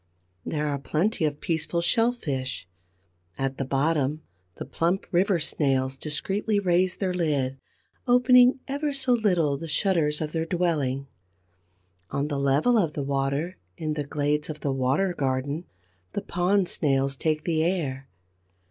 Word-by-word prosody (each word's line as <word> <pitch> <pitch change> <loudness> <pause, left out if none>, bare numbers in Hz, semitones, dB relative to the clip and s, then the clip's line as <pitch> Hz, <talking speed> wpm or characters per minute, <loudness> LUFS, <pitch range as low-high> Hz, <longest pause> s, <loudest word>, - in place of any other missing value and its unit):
There 150 -1 -2
are 140 -1 -1
plenty 165 - 0
of 145 -1 -2
peaceful 165 +1 -1
Shellfish. 165 - 0 0.7
At 135 0 -2
the 135 - -1
bottom, 145 +2 0 0.3
the - - -6
plump 170 +7 -1
River 185 +1 +3
snails 135 -4 0
discreetly 195 +9 -1
raise 180 -1 +2
their 185 -2 -1
lid, 140 -6 0 0.5
opening 250 +1 +5
ever 285 +1 -2
so 265 -2 +1
little 180 -11 +2
the 165 - -7
shutters 155 -2 +1
of 155 -1 -3
their 165 0 -2
dwelling; 150 -7 0 1.0
on 140 +2 -2
the 145 -2 -2
level 145 - +3
of 165 -6 0
the 145 - -3
water, 140 +5 -1 0.2
in 155 -1 -2
the 150 -1 -2
glades 150 +1 -1
of 150 -1 -6
the 140 - 0
water 135 +9 +1
garden, 140 +3 -2 0.5
the 205 - -3
Pond 185 +1 +1
snails 135 -3 +1
take 155 +2 -1
the 160 -2 +1
air. 145 -7 -2
155 Hz, 145 wpm, -26 LUFS, 140-185 Hz, 1.0 s, opening